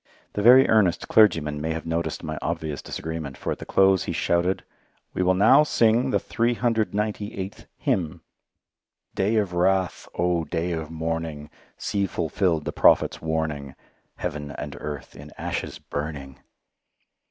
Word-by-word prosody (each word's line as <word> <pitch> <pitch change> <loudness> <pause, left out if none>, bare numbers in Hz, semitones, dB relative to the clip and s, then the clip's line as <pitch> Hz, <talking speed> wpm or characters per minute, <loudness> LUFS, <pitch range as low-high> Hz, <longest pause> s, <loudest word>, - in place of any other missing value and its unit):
The 105 - -2
very 125 +5 +8
earnest 100 -5 +3
clergyman 75 -9 +4
may 80 +1 -1
have 80 -1 -5
noticed 85 +1 -2
my 75 -1 -4
obvious 80 -4 -3
disagreement, 80 -4 -6
for - - -3
at - - -4
the - - -9
close 95 -1 +4
he - - -3 0.2
announced, 90 +2 +1 0.5
"We - - -1
will 90 0 +3
now 110 +9 +6
sing 120 -3 +3
the - - +2
398th 110 -4 -1
hymn" 90 - -1 0.9
"Day 100 +4 +1
of 100 -5 0
Wrath, 90 -1 +1
oh! 85 -1 +1
Day 85 +1 -2
of 80 -2 -4
Mourning, 80 -2 -4 0.3
See 100 -1 -1
fulfilled 85 -2 0
the - - -2
Prophet's - - +4
warning, 80 -4 -3 0.4
Heaven 75 -1 -4
and - - -6
earth 75 -2 -7
in 75 +1 -11
ashes - - -4
burning." 70 -3 -6
85 Hz, 140 wpm, -25 LUFS, 80-100 Hz, 0.9 s, very